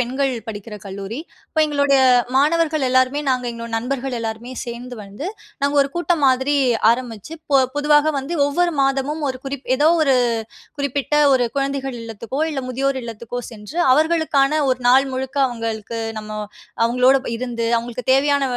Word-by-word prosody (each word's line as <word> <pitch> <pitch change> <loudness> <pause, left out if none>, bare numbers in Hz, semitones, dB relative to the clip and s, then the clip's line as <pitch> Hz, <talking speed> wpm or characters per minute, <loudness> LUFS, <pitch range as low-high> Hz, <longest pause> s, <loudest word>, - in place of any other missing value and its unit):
பெண்கள் 260 +2 0 0.2
படிக்கிற 210 0 -7
கல்லூரி. 195 +4 -6 0.3
அப்போ 315 - 0
எங்களுடைய 285 -2 +2 0.4
மாணவர்கள் 310 0 +2
எல்லோருமே 260 +3 +2
நாங்க 255 -1 0
எங்களோட 230 0 -7
நண்பர்கள் 255 +2 -3
எல்லாருமே 225 +2 -5
சேந்து 245 +1 -7
வந்து, 205 - -7 0.4
நாங்க 285 +1 +1
ஒரு 275 - -3
கூட்டம் 345 -2 0
மாதிரி 265 +2 +2 0.4
ஆரம்பிச்சு, 235 +1 -3 0.2
பொ 275 - +7 0.2
பொதுவாக 295 +1 +3
வந்து 280 +6 -4
ஒவ்வொரு 345 +4 +1
மாதமும் 275 +3 0
ஒரு 255 -1 -4
குறிப் 270 0 -6
ஏதோ 295 +3 +4
ஒரு 275 -3 +3 0.6
குறிப்பிட்ட 280 +1 -1 0.2
ஒரு 250 -2 +3
குழந்தைகள் 275 -2 -2
இல்லத்துக்கோ 230 +4 -6
இல்ல 275 -3 -3
முதியோர் 265 +1 -1
இல்லத்துக்கோ 235 +1 -6
சென்று 225 +8 -8 0.2
அவர்களுக்கான 310 -2 +2
ஒரு 255 - 0
நாள் 265 +2 +5
முழுக்க 265 +2 -4
அவுங்களுக்கு 230 -2 -4 0.2
நம்ம 215 - -10 0.5
அவுங்களோட 250 +3 +4
ப - - -2
இருந்து 235 -2 -3
அவுங்களுக்கு 235 +1 -5
தேவையான 280 +1 +3
265 Hz, 150 wpm, -20 LUFS, 235-285 Hz, 0.6 s, பொ